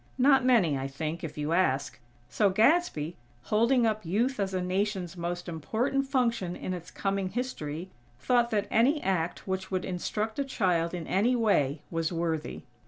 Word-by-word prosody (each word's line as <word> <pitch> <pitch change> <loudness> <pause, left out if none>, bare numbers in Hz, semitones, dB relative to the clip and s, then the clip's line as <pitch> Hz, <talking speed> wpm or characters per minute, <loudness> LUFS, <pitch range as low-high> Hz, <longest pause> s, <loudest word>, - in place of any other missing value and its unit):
Not 265 0 +5
many, 200 - +3
I 135 - -3
think, 155 +4 -4
if 155 -2 -6
you 150 +2 -1
ask. 145 -7 +1 0.3
So 205 -2 +2
Gadsby, 195 - +2 0.3
holding 235 - +3
up 215 -1 0
Youth 225 +10 0
as 195 -1 0
a 185 - -1
Nation's 185 0 -1
most 175 +1 -4
important 230 - -1
function 235 -9 0
in 185 - -4
its 175 -1 -7
coming 195 -1 -2
history, 185 - -4 0.3
thought 240 - +2
that 205 -2 0
any 270 +7 +4
act 180 -2 -1
which 190 0 -3
would 185 -1 -2
instruct 210 +6 -3
a - - +2
child 180 -10 0
in 170 -2 -5
any 220 +10 +2
way, 155 - +1
was 165 0 -1
worthy. 165 -2 -2
190 Hz, 170 wpm, -29 LUFS, 165-230 Hz, 0.3 s, Not